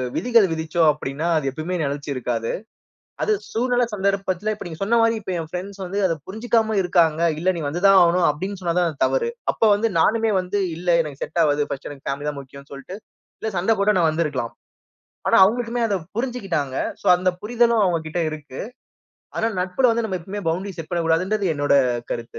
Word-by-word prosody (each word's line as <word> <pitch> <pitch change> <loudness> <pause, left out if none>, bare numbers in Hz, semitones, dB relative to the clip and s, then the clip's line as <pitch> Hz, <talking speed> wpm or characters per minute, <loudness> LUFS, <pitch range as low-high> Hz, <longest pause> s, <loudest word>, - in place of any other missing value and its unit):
விதிகள் 230 -5 +4
விதிச்சோம் 160 0 +2
அப்படீன்னா, 150 +2 -4
அது 155 - -2
எப்பவுமே 155 +6 -4
நெலைச்சு 145 +1 -3
இருக்காது. 115 -2 -2 0.7
அது 435 - +1 0.2
சூழ்நில 245 - +1
சந்தர்ப்பத்துல, 195 0 -1
இப்ப - - -9
நீங்க 160 -2 -9
சொன்ன 230 +4 +3
மாரி 230 0 +3
இப்ப 190 -2 -4
என் 160 -1 -6
ஃபிரெண்ட்ஸ் 195 +2 -6
வந்து 195 +3 -3
அத 165 - -1
புரிஞ்சுக்காம 220 +1 0
இருக்காங்க. 170 -3 +2 0.2
"இல்ல, 185 +3 +2
நீ 165 - -4
வந்து 170 +5 -4
தான் 195 -1 +7
ஆகணும்." 175 +1 +3
அப்படீன்னு 190 +6 -5
சொன்னா 170 -1 -1
தான் 175 - +2
அது 150 - -2
தவறு. 470 -2 0 0.2
அப்ப - - -23
வந்து 225 +2 0
நானுமே 225 +5 +3
வந்து 195 +3 -2 0.2
இல்ல, 180 - -9 0.2
எனக்கு 145 -3 -9
செட் 170 - -1
ஆவாது. 145 -1 +1
1ஸ்ட் 135 - -5
எனக்கு 140 -2 -11
பேமிலி 145 +2 -2
தான் 145 -1 -5
முக்கியம்ன்னு 140 +1 -13
சொல்லிட்டு 140 +8 -8 0.4
இல்ல 220 - -1
சண்ட 185 +6 +1
போட்டு 200 0 +3
நான் 165 -2 +4
வந்துருக்கலாம். 150 -7 -2 0.7
ஆனா, - - +5
அவங்களுக்குமே 235 +3 +1
அத 205 - 0 0.2
புரிஞ்சிக்கிட்டாங்க. 195 - -2 0.3
சோ - - -17
அந்த 185 +1 +1
புரிதலும் 235 0 +2
அவங்க 175 -2 +2
கிட்ட 160 +3 -3
இருக்கு. 145 -4 -8 0.8
ஆனா, 225 - +1
நட்புல 190 +8 +2
வந்து 230 0 -1
நம்ம 190 -3 -3
எப்பவுமே 200 +4 -6
பவுண்டரி 185 +5 -2
செட் 165 - -7
பண்ணக்கூடாதுங்குறது 175 +3 +1
என்னோட 145 -1 +2 0.4
கருத்து. 115 0 -6
180 Hz, 190 wpm, -22 LUFS, 155-210 Hz, 0.8 s, தான்